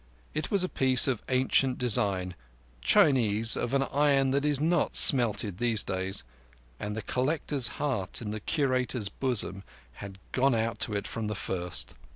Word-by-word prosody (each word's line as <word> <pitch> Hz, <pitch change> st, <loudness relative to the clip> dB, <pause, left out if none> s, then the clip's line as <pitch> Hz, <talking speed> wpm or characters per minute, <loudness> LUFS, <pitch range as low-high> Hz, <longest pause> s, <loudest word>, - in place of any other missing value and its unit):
It 155 Hz, -, -3 dB
was 200 Hz, -2 st, +1 dB
a -, -, 0 dB
piece 130 Hz, -6 st, +3 dB
of 130 Hz, -5 st, -1 dB
ancient 130 Hz, 0 st, +2 dB
design, 100 Hz, -7 st, 0 dB, 0.5 s
Chinese, 115 Hz, -, +3 dB
of 125 Hz, +3 st, -2 dB
an 135 Hz, -, +2 dB
iron 140 Hz, -1 st, +2 dB
that 140 Hz, +2 st, 0 dB
is 145 Hz, -2 st, +1 dB
not 165 Hz, +2 st, +1 dB
smelted 105 Hz, -7 st, +2 dB
these 115 Hz, -3 st, +1 dB
days; 95 Hz, -5 st, -2 dB, 0.6 s
and 105 Hz, 0 st, -4 dB
the 110 Hz, -, -5 dB
collector's 135 Hz, -1 st, 0 dB
heart 120 Hz, -11 st, -2 dB
in 105 Hz, -3 st, -5 dB
the 110 Hz, -, -4 dB
Curator's 130 Hz, -5 st, -1 dB
bosom 105 Hz, -5 st, -1 dB, 0.4 s
had 100 Hz, -1 st, -8 dB
gone 135 Hz, -1 st, +2 dB
out 115 Hz, 0 st, -2 dB
to 105 Hz, -, -1 dB
it 100 Hz, -, -3 dB
from 115 Hz, -2 st, -4 dB
the 105 Hz, -, -3 dB
first. 90 Hz, -2 st, -1 dB
120 Hz, 165 wpm, -28 LUFS, 105-135 Hz, 0.6 s, piece